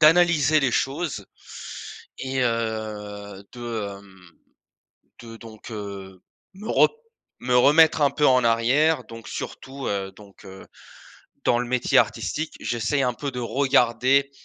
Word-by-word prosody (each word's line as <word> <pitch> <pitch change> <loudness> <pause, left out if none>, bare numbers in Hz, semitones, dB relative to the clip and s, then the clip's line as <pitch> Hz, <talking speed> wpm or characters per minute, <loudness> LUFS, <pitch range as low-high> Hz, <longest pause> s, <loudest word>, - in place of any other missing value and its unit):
d'analyser 155 -2 +5
les 135 - +1
choses, 135 - -2 0.9
et 130 0 -2
heu, 105 -4 -3
de, 110 -5 -5
hem, 95 -3 -18 0.9
de 115 -1 -11
donc, 110 0 -12
heu, 100 -3 -8 0.3
me 210 +3 -9
re - - +5 0.5
me 125 0 0
remettre 155 +4 +5
un 140 - +4
peu 150 - +1
en 130 -1 +4
arrière, 130 +6 +3
donc, 115 0 -11
surtout 135 0 -6
heu, 95 -1 -2
donc, 100 -1 -16
heu, 95 0 -11 0.8
dans 120 - +3
le 125 - -2
métier 125 0 +1
artistique, 160 +1 0
j'essaye 120 +4 -1
un 125 -1 +1
peu 140 +4 -5
de 125 - -5
regarder, 130 +1 +2
120 Hz, 135 wpm, -24 LUFS, 105-140 Hz, 0.9 s, d'analyser